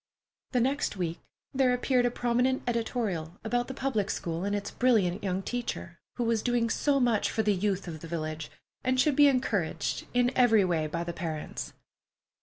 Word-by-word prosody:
The 250 - +3
next 270 -3 0
week 170 -2 -2 0.3
there 260 -2 +3
appeared 250 0 +2
a - - +2
prominent 245 +2 +1
editorial 225 -8 -2
about 245 +2 0
the 265 - -6
public 220 -8 -1
school 170 +1 -3
and 200 +1 0
its 205 0 -3
brilliant 210 -6 +2
young 190 -1 -1
teacher, 225 -8 -4 0.2
who 245 - -1
was 230 -2 +1
doing 240 -1 +1
so 280 +2 +2
much 240 -4 +2
for 220 - 0
the 210 0 +3
youth 195 0 -1
of 160 -2 -6
the 165 - -9
village, 155 -2 -4 0.3
and 255 0 +1
should 290 +1 +3
be 290 +1 +7
encouraged 205 - 0
in 245 0 +3
every 225 -5 +5
way 165 -4 0
by 170 +2 -3
the 170 0 -4
parents. 160 -3 -5
220 Hz, 185 wpm, -29 LUFS, 175-245 Hz, 0.3 s, be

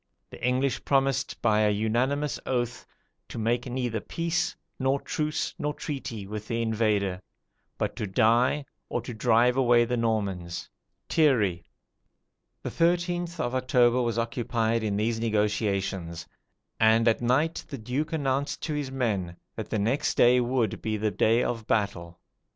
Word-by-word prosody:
The - - -11
English 130 +2 +1
promised 135 -2 +1
by 110 -2 +4
a 105 -1 +4
unanimous 120 +8 0
oath, 120 -2 -2 0.4
to - - -7
make 120 +3 0
neither 120 -3 -2
peace, 170 +8 -2 0.2
nor 135 +1 +1
truce 155 +2 -2
nor 150 0 -2
treaty, 130 -8 -5
with 105 +1 -6
the 115 - -1
invader, 105 -4 0 0.6
but - - -2
to 105 - -2
die, 120 +8 +3 0.2
or - - -1
drive 120 +1 +2
away 120 -2 +5
the 125 +1 -1
Normans." 100 -7 -2 0.4
[Thierry.] 110 - +2 1.0
The - - -4
13th 175 0 0
of 125 -5 -1
October 125 -1 +3
was 120 -1 -1
occupied 115 -1 0
in 105 -2 -1
these 110 +2 0
negotiations; 100 -6 -1 0.5
and 110 +1 +4
at 115 - +3
night 135 +7 +1
the 145 -4 -6
Duke 125 +7 -3
announced 140 -3 -1
to 155 - -2
his 145 -2 -2
men 100 -10 -2 0.2
that - - -6
the - - -1
next 125 +9 0
day 125 +1 +6
would, 120 -2 0
be 110 -1 -1
the 105 0 0
day 110 +5 +3
of 115 -2 -3
battle. 85 -5 -1
120 Hz, 145 wpm, -27 LUFS, 110-135 Hz, 1.0 s, day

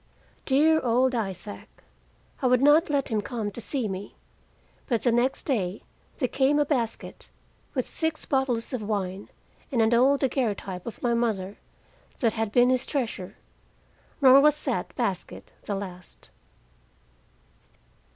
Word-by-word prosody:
Dear 310 +4 +4
old 255 +2 +2
Isaac! 205 -3 -3 0.7
I 260 - +2
would 250 +1 +3
not 300 +4 +5
let 285 -2 0
him 215 -1 +1
come 215 -2 -4
to 235 - -8
see 245 +2 -2
me, 195 0 -6 0.7
but 235 -5 0
the 240 - +3
next 240 +3 +1
day 200 -8 -2 0.3
there 255 - 0
came 270 +3 +2
a 295 - +3
basket, 240 -6 -3 0.5
with 255 - -1
six 320 -1 -2
bottles 265 -4 -1
of 250 - -2
wine, 200 -2 -3 0.4
and 250 - 0
an 225 +1 +3
old 265 +4 +4
daguerreotype 210 -9 -2
of 230 - -8
my 240 -1 +2
mother, 210 -5 -1 0.6
that 230 -4 +1
had 220 -1 -2
been 245 +2 +4
his 255 0 0
treasure. 230 -9 -3 0.9
Nor 265 +1 +8
was 300 +1 +3
that - - -2
basket - - -3
the 205 - -2
last. 180 -2 -9
240 Hz, 140 wpm, -26 LUFS, 210-270 Hz, 0.9 s, Nor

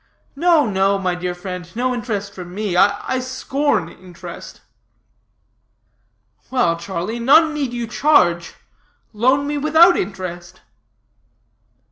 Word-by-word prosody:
No, 330 0 +3
no, 195 -1 +1
my 185 -2 -1
dear 180 0 -4
friend, 180 -1 -7
no 250 +2 0
interest 210 -5 -4
for 185 - -8
me. 185 +2 -4
I 205 +7 +2
scorn 260 - -1
interest." 175 -1 -11 1.9
"Well, 245 -10 +1
Charlie, 190 +6 -5
none 310 +6 +5
need 285 -5 -2
you 240 -1 -3
charge. 215 - +2 0.6
Loan 260 +6 +2
me 290 0 -2
without 320 +4 +5
interest." 180 -2 -6
210 Hz, 110 wpm, -19 LUFS, 180-270 Hz, 1.9 s, none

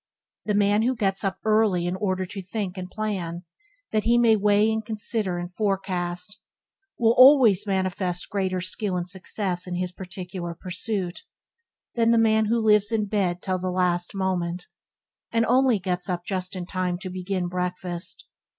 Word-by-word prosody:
The 210 - 0
man 205 +1 +3
who 255 +3 +1
gets 195 -4 0
up 195 -1 -1
early 215 -5 +3
in 175 +1 -1
order 190 -1 -1
to 195 +2 -7
think 190 0 -4
and 185 -1 -6
plan, 185 -5 -4 0.5
that 215 -1 0
he 235 +1 +4
may 230 -2 +5
weigh 210 +1 +3
and 220 0 -1
consider 215 -3 0
and 175 +1 -6
forecast, 190 -1 -2 0.6
will 230 -3 +4
always 250 -7 +7
manifest 185 -2 -1
greater 185 -2 -1
skill 185 +1 -1
and 175 0 -3
success 185 -1 -2
in 180 - -3
his 180 0 -2
particular 180 -1 -7
pursuit, 180 +1 -3 0.7
than 230 -1 +2
the 230 - +4
man 220 -1 +3
who 230 +2 +1
lives 210 0 +5
in 220 -2 +1
bed 190 -4 -1
till 185 -1 -1
the 185 +1 -2
last 180 0 0
moment, 180 -2 -2 0.7
and 230 0 +2
only 255 -1 +3
gets 180 -1 -1
up 175 -1 -3
just 185 0 -3
in 180 -1 -4
time 180 -1 -2
to 185 0 -7
begin 185 0 -3
breakfast. 180 0 -4
190 Hz, 170 wpm, -25 LUFS, 180-215 Hz, 0.7 s, always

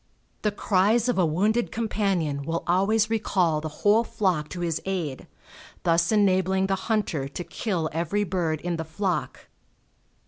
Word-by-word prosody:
The 210 - +2
cries 205 +3 +2
of 240 - +1
a 180 - +4
wounded 210 +9 +1
companion 195 -10 -1
will 165 +4 -3
always 205 +5 +2
recall 180 -8 +1
the 155 - -4 0.2
whole 215 +3 +5
flock 180 -9 -1
to 180 - -6
his 165 -2 -1
aid, 175 -8 -3 0.6
thus 170 0 +2
enabling 190 -2 +3
the 195 - 0 0.2
hunter 190 -11 0
to 145 +5 -6
kill 180 -5 -2
every 170 +6 0
bird 170 -5 -1
in 175 -1 -2
the 160 - -3
flock. 170 +1 -3
185 Hz, 150 wpm, -25 LUFS, 165-205 Hz, 0.6 s, whole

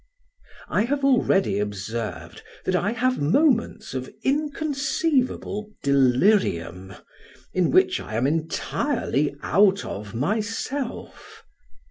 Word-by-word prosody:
I 210 - +1
have 280 +2 -1
already 195 - +3
observed 105 +2 -5 0.2
that 185 - +1
I 195 +3 +1
have 255 -1 0
moments 235 - +1
of 130 -1 -4
inconceivable 285 -6 -1
delirium, 125 - +2 0.6
in 185 -2 +2
which 370 0 +3
I 110 - -7
am 120 +3 +1
entirely 155 - -1
out 195 +2 +3
of 105 +2 -7
myself. 220 - -4
195 Hz, 95 wpm, -24 LUFS, -, 0.6 s, already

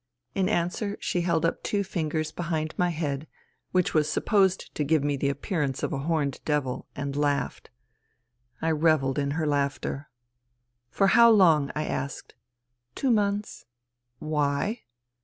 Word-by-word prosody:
In 190 -1 +1
answer 180 +4 -1
she 175 - -1
held 170 -2 +1
up 165 - -1
two 205 -1 0
fingers 155 -4 -2
behind 160 -2 -2
my 180 0 +1
head 150 -3 -3 0.4
which 180 -1 +1
was 155 -1 +2
supposed 190 -3 +1
to 150 - -1
give 150 0 +2
me 145 0 +1
the 140 0 0
appear 150 +4 -2
ance 135 -2 -2
of - - -1
a 140 - -2
horned 145 -2 -1
devil, 145 -4 -1
and 140 0 -4
laughed. 145 -1 -1 0.9
I 165 - +2
revelled 150 -3 +2
in 140 -1 0
her 160 - 0
laughter. 140 0 -1 0.4
" 120 - -48 0.3
For 195 - +2
how 235 +3 +7
long? 165 -10 +5
" - - -29
I 155 - -1
asked. 130 +1 -4 0.3
" 120 0 -51
Two 265 - +1
months." 205 - -1 0.3
" - - -56 0.2
Why 150 - -1
155 Hz, 165 wpm, -27 LUFS, 140-175 Hz, 0.9 s, how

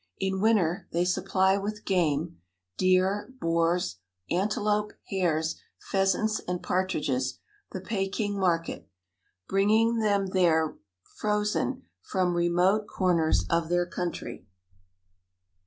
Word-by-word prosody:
In 190 0 -1
winter 195 -5 +2
they 175 +1 +1
supply 190 +1 +2
with 210 +1 -5
game 155 - 0 0.4
deer, 185 - +2
boars, 165 - +1 0.3
antelope, 210 +3 0 0.2
hares, 160 -4 0 0.2
pheasants 195 +3 0
and 180 0 -3
partridges 145 -9 -1 0.3
the 190 - -5
Peking 200 +1 -2
market, 170 - -1 0.6
bringing 220 +4 +3
them 205 -2 +2
there 165 -4 +2 0.4
frozen 210 +5 0 0.2
from 185 -2 0
remote 180 +5 +2
corners 165 - +1
of 165 - 0
their 175 0 +2
country. 175 - -5
185 Hz, 100 wpm, -27 LUFS, 170-205 Hz, 0.6 s, bringing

